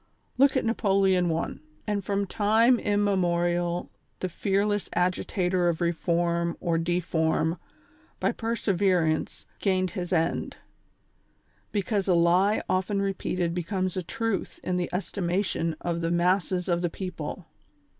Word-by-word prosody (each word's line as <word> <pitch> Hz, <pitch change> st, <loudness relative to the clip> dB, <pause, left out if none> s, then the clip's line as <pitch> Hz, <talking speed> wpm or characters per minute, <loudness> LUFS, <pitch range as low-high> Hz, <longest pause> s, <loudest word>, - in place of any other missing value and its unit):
Look 275 Hz, 0 st, +5 dB
at -, -, 0 dB
Napoleon 195 Hz, -5 st, +2 dB
I., 165 Hz, +1 st, -2 dB, 0.3 s
and 205 Hz, -1 st, -1 dB
from 200 Hz, +1 st, 0 dB
time 225 Hz, +5 st, +3 dB
immemorial 175 Hz, -4 st, +1 dB, 0.3 s
the 185 Hz, -, -2 dB
fear 195 Hz, +3 st, 0 dB
less 205 Hz, -2 st, -1 dB
agitator 180 Hz, 0 st, +1 dB
of 165 Hz, -, -1 dB
reform 170 Hz, 0 st, 0 dB
or 165 Hz, -1 st, 0 dB
deform, 165 Hz, -1 st, 0 dB, 0.6 s
by -, -, +2 dB
perseverance, 190 Hz, -8 st, 0 dB
gained 185 Hz, -2 st, +1 dB
his 175 Hz, 0 st, -5 dB
end; 165 Hz, -2 st, 0 dB, 1.1 s
because 200 Hz, -1 st, -1 dB
a 180 Hz, -, +4 dB
lie 180 Hz, +5 st, +3 dB
often 190 Hz, +2 st, 0 dB
repeated 185 Hz, -3 st, -1 dB
becomes 185 Hz, +1 st, -2 dB
a 185 Hz, -, -1 dB
truth 225 Hz, +4 st, -3 dB
in 180 Hz, 0 st, -1 dB
the 175 Hz, -1 st, -1 dB
estimation 180 Hz, -3 st, -1 dB
of 170 Hz, -1 st, -2 dB
the 165 Hz, -, 0 dB
masses 180 Hz, +1 st, +1 dB
of 175 Hz, -1 st, +1 dB
the 175 Hz, -, 0 dB
people. 180 Hz, -1 st, -6 dB
180 Hz, 125 wpm, -27 LUFS, 170-200 Hz, 1.1 s, Look